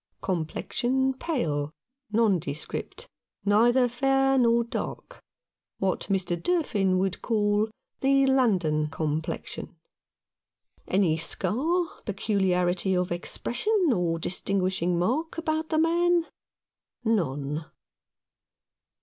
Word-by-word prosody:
Complexion 245 +10 0
pale, 160 - -2 0.4
nondescript, 185 -10 -1 0.4
neither 240 +5 +4
fair 270 +2 +2
nor 235 -1 +4
dark 370 - -6 0.3
— - - -65
what 190 -1 -1
Mr. 185 -3 0
Durfin 200 - +1
would 190 0 -1
call 210 -1 +1 0.3
the 275 0 +4
London 190 - +2
complexion. 155 0 -4 1.1
Any 185 -5 +2
scar, 260 - +1 0.2
peculiarity 190 -3 +1
of 180 -1 -1
expression, 300 - 0
or 175 -4 0
distin 190 +4 -1
guishing 180 -1 0
mark 265 - -1
about 315 -1 -1
the 315 - +1
man? 340 +1 +3 0.8
None. 150 -7 -1
205 Hz, 90 wpm, -27 LUFS, 175-265 Hz, 1.1 s, neither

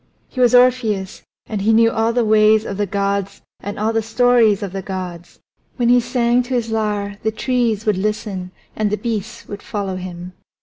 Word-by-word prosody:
He 255 - -8
was 245 0 +5
Orpheus, 235 -6 +2 0.2
and 210 -2 -4
he 215 +3 +2
knew 230 +1 +5
all 225 0 +1
the 240 -1 +1
ways 215 0 +4
of 195 - -5
the 205 -1 -1
gods 200 0 -2 0.2
and 205 0 -6
all 220 +2 0
the 225 - +1
stories 225 -2 +3
of 195 -2 -5
the 195 - -3
gods; 180 -2 -7 0.4
when 240 -2 +1
he 245 0 +6
sang 240 0 +1
to 250 +1 -3
his 230 -2 -2
lyre 205 -2 -2
the 220 - 0
trees 230 -2 -1
would 210 -3 +1
listen 200 -3 -3 0.3
and 215 -1 0
the 210 - -1
beasts 220 -3 -5
would 205 0 -7
follow 200 -6 -4
him. 180 0 -8
215 Hz, 200 wpm, -19 LUFS, 200-235 Hz, 0.4 s, he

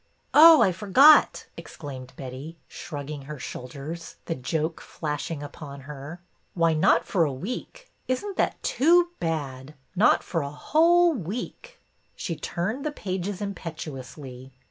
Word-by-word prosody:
'' - - -44
Oh, 320 0 +9
I 185 - +3
forgot," 235 - +5
exclaimed 130 -4 -9
Betty, 135 +5 -8
shrugging 145 -1 -7
her 150 +1 -7
shoulders, 140 +7 -7
the 165 - -2
joke 160 +3 -3
flashing 150 0 -5
upon 140 -1 -9
her. 145 +4 -9 0.4
Why, 165 -2 +3
not 155 - +3
for 180 -4 +2
a 150 - 0
week. 250 - -7 0.2
Is 255 +8 -1
n't 400 -2 -5
that - - 0
too 345 +5 +4
bad! 145 -4 -4 0.2
Not 205 +6 +4
for 165 - -2
a 140 - -4
whole 335 - +3
week! 250 - -6 0.2
" - - -42
She 170 - -4
turned 185 - -3
the 305 - -2
pages 190 -5 -4
impetuously. 140 -8 -7
165 Hz, 145 wpm, -26 LUFS, 145-225 Hz, 0.4 s, Oh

